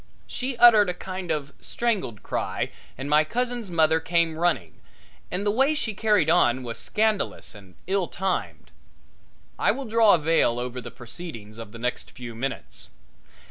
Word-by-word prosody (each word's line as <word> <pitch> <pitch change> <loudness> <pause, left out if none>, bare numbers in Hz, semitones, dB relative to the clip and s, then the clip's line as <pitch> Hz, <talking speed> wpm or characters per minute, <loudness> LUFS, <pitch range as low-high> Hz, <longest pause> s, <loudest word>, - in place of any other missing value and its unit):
She 255 0 -4
uttered 220 -5 +7
a 180 - -2
kind 185 -1 -6
of 150 -3 -2
a - - -25
strangled 200 - -2
cry - - -2 0.3
and 135 - -5
my 150 +1 +5
cousin's 240 +3 -2
mother 160 -2 +3
came 165 0 +1
running, 155 - -1 0.5
and 185 +4 -2
the 205 - +3
way 270 +7 +3
she 225 -7 -2
carried 210 -5 +2
on 130 -7 +3
was 115 -2 -6
scandalous 215 -1 -1
and 100 -4 -15
ill 190 -1 0
timed. 190 0 -3 0.9
I - - +3
will 275 - 0
draw 225 -3 +5
a - - +2
veil 155 -6 +2
over 125 +1 -4
the - - -8
proceedings 115 -5 -9
of 110 -2 -8
the 115 - -9
next 125 +1 -3
few 120 -2 -9
minutes. 130 +4 -5
170 Hz, 170 wpm, -25 LUFS, 125-210 Hz, 0.9 s, uttered